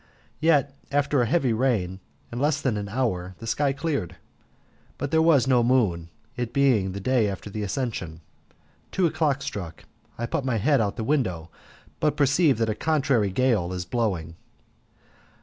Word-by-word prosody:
Yet 145 Hz, -4 st, +2 dB, 0.2 s
after 140 Hz, -1 st, +2 dB
a 120 Hz, -, +1 dB
heavy 130 Hz, -4 st, +2 dB
rain, 110 Hz, -7 st, 0 dB, 0.3 s
in 120 Hz, -, -4 dB
less 145 Hz, +2 st, +1 dB
than 125 Hz, -5 st, 0 dB
an 100 Hz, -1 st, -4 dB
hour, 95 Hz, -6 st, -2 dB
the 115 Hz, -, -9 dB
sky 140 Hz, +5 st, +1 dB
cleared, 135 Hz, -, -3 dB, 0.8 s
but 140 Hz, +1 st, -4 dB
there 160 Hz, -, +4 dB
was 160 Hz, -6 st, +4 dB
no 125 Hz, -2 st, +4 dB
moon, 105 Hz, -10 st, +1 dB, 0.3 s
it 120 Hz, -2 st, -4 dB
being 120 Hz, -9 st, +2 dB
the 100 Hz, -, -5 dB
day 120 Hz, +1 st, +2 dB
after 100 Hz, +1 st, -6 dB
the 105 Hz, -, -4 dB
Ascension. 100 Hz, -, -3 dB, 0.7 s
Two 185 Hz, -, +1 dB
o'clock 155 Hz, -4 st, 0 dB
stuck. 90 Hz, -, -6 dB, 0.3 s
I 120 Hz, -, -2 dB
put 145 Hz, +4 st, -2 dB
my 130 Hz, -3 st, 0 dB
head 135 Hz, +4 st, +3 dB
out 100 Hz, -2 st, 0 dB
at -, -, -26 dB
the 115 Hz, -, -3 dB
window, 95 Hz, -, -1 dB, 0.5 s
but 150 Hz, -1 st, +1 dB
perceive 145 Hz, -1 st, +3 dB
that 115 Hz, -1 st, +1 dB
a -, -, +1 dB
contrary 135 Hz, -5 st, +1 dB
gale 100 Hz, -4 st, +1 dB
is 90 Hz, -1 st, -4 dB
blowing. 90 Hz, -7 st, -2 dB
120 Hz, 170 wpm, -25 LUFS, 100-140 Hz, 0.8 s, there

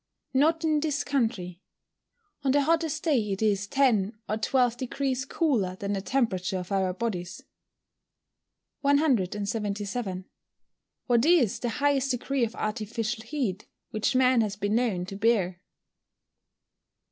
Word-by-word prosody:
_ -, -, -56 dB, 0.4 s
Not 320 Hz, +3 st, +3 dB
in 310 Hz, -2 st, +2 dB
this 295 Hz, -2 st, -1 dB
country. 220 Hz, -10 st, -1 dB, 0.8 s
On 270 Hz, -, +1 dB
the 285 Hz, +1 st, +3 dB
hottest 315 Hz, 0 st, 0 dB
day 300 Hz, -6 st, +3 dB
it 195 Hz, -, -3 dB
is 200 Hz, -2 st, +1 dB
10 220 Hz, -5 st, +2 dB
or 215 Hz, -, -1 dB
12 245 Hz, +1 st, +1 dB
deg. 265 Hz, +1 st, -2 dB
cooler 230 Hz, -, +1 dB
than 200 Hz, +1 st, -3 dB
the 195 Hz, -, -2 dB
temperature 195 Hz, -6 st, 0 dB
of 180 Hz, +1 st, -6 dB
our 190 Hz, -2 st, +1 dB
bodies. 185 Hz, -2 st, -4 dB, 1.4 s
177. 210 Hz, -, 0 dB, 0.8 s
_What 240 Hz, -2 st, +3 dB
is 310 Hz, -, +4 dB
the 240 Hz, -, -2 dB
highest 275 Hz, +2 st, +1 dB
degree 260 Hz, +1 st, 0 dB
of 230 Hz, 0 st, -2 dB
artificial 220 Hz, +1 st, -3 dB
heat 225 Hz, -8 st, -3 dB, 0.2 s
which 215 Hz, +4 st, 0 dB
man 255 Hz, -2 st, +4 dB
has 210 Hz, -2 st, -1 dB
been 205 Hz, 0 st, -1 dB
known 220 Hz, -7 st, +1 dB
to 195 Hz, -, -7 dB
bear? 195 Hz, -4 st, +1 dB
230 Hz, 135 wpm, -27 LUFS, 200-275 Hz, 1.4 s, is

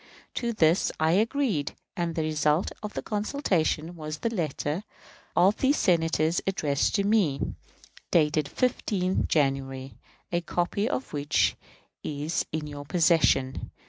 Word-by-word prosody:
To 235 Hz, -1 st, -1 dB
this 170 Hz, -5 st, +3 dB
I 160 Hz, 0 st, +3 dB
agreed, 215 Hz, -, +1 dB, 0.2 s
and 170 Hz, -2 st, -2 dB
the 160 Hz, -, 0 dB
result 155 Hz, +2 st, +1 dB
of 210 Hz, -1 st, -6 dB
the -, -, -3 dB
consultation 190 Hz, -, -1 dB
was 155 Hz, -1 st, -5 dB
the 230 Hz, +8 st, -2 dB
letter 160 Hz, -1 st, -2 dB, 0.5 s
of 195 Hz, +4 st, +4 dB
these 275 Hz, +2 st, +2 dB
Senators 165 Hz, -2 st, +2 dB
addressed 150 Hz, -7 st, +1 dB
to 200 Hz, -, +2 dB
me, 195 Hz, -10 st, +2 dB, 0.7 s
dated 155 Hz, -2 st, +3 dB
15th 190 Hz, -, 0 dB
January, 135 Hz, -2 st, -1 dB, 0.3 s
a 175 Hz, 0 st, +1 dB
copy 175 Hz, +6 st, -1 dB
of 265 Hz, -, -3 dB
which 145 Hz, 0 st, +2 dB, 0.5 s
is 150 Hz, +3 st, -2 dB
in 155 Hz, -1 st, -3 dB
your 145 Hz, -1 st, -7 dB
possession. 155 Hz, -5 st, +2 dB
165 Hz, 130 wpm, -27 LUFS, 150-195 Hz, 0.7 s, of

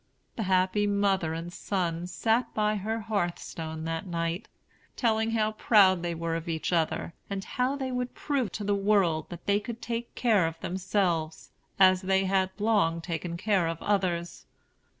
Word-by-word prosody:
The -, -, -3 dB
happy 190 Hz, +3 st, +2 dB
mother 195 Hz, -5 st, +1 dB
and 170 Hz, +1 st, -6 dB
son 175 Hz, -3 st, -2 dB
sat 225 Hz, +6 st, +1 dB
by 215 Hz, 0 st, +1 dB
her 220 Hz, +3 st, -2 dB
hearthstone 170 Hz, -6 st, -3 dB
that 165 Hz, +3 st, -3 dB
night, 170 Hz, +3 st, -2 dB, 0.5 s
telling 220 Hz, -2 st, +1 dB
how 220 Hz, -1 st, +1 dB
proud 200 Hz, -4 st, +4 dB
they 170 Hz, -1 st, -2 dB
were 165 Hz, 0 st, -2 dB
of 165 Hz, 0 st, -4 dB
each 160 Hz, +2 st, -2 dB
other, 165 Hz, 0 st, 0 dB, 0.2 s
and 195 Hz, -1 st, -3 dB
how 255 Hz, +7 st, -1 dB
they 265 Hz, -2 st, -3 dB
would 250 Hz, 0 st, -3 dB
prove 265 Hz, -9 st, -1 dB
to 210 Hz, -, -4 dB
the 205 Hz, 0 st, +1 dB
world 195 Hz, -5 st, +2 dB
that 175 Hz, -, -9 dB
they 200 Hz, +1 st, +3 dB
could 230 Hz, +2 st, -7 dB
take 235 Hz, 0 st, -4 dB
care 215 Hz, -8 st, +3 dB
of 165 Hz, 0 st, -6 dB
themselves, 180 Hz, -4 st, -1 dB, 0.3 s
as 185 Hz, -1 st, +6 dB
they 190 Hz, 0 st, +2 dB
had 190 Hz, 0 st, +2 dB
long 205 Hz, -6 st, +2 dB
taken 170 Hz, 0 st, -4 dB
care 190 Hz, -2 st, +1 dB
of 165 Hz, 0 st, -3 dB
others. 180 Hz, -4 st, -1 dB
190 Hz, 170 wpm, -28 LUFS, 170-215 Hz, 0.5 s, as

